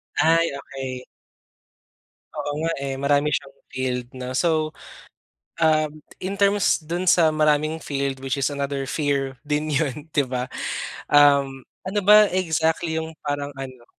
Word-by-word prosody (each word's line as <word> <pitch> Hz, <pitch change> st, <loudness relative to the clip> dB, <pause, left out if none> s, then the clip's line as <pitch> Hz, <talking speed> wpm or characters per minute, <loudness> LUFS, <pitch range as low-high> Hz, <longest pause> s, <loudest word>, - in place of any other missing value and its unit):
Ay 165 Hz, +1 st, +4 dB
okey. 130 Hz, -2 st, -6 dB, 1.3 s
Oo -, -, -3 dB
nga 165 Hz, -, +1 dB
eh, 135 Hz, -1 st, -3 dB
marami 145 Hz, +1 st, +2 dB
siyang 135 Hz, 0 st, -3 dB, 0.2 s
field 125 Hz, -2 st, -2 dB
no. 125 Hz, 0 st, -5 dB
So, 170 Hz, +6 st, +2 dB, 1.1 s
um 155 Hz, -1 st, +2 dB, 0.2 s
in 190 Hz, +2 st, -4 dB
terms 200 Hz, -2 st, +2 dB
dun 175 Hz, +4 st, -3 dB
sa 165 Hz, -2 st, +5 dB
maraming 155 Hz, +1 st, +2 dB
field 140 Hz, -3 st, -3 dB
which 135 Hz, +1 st, -2 dB
is 140 Hz, +1 st, 0 dB
another 140 Hz, -1 st, -2 dB
fear 140 Hz, -3 st, -1 dB
din 150 Hz, +1 st, -1 dB
yun, 150 Hz, +1 st, -2 dB
'di 145 Hz, -2 st, +2 dB
ba? 125 Hz, 0 st, -3 dB, 0.6 s
Um, 140 Hz, -2 st, +4 dB, 0.2 s
ano 195 Hz, +2 st, -1 dB
ba 210 Hz, +2 st, +8 dB
exactly 160 Hz, -2 st, 0 dB
yung 160 Hz, 0 st, -5 dB
parang 145 Hz, 0 st, -3 dB
ano 130 Hz, -3 st, -8 dB
145 Hz, 135 wpm, -23 LUFS, 135-160 Hz, 1.3 s, ba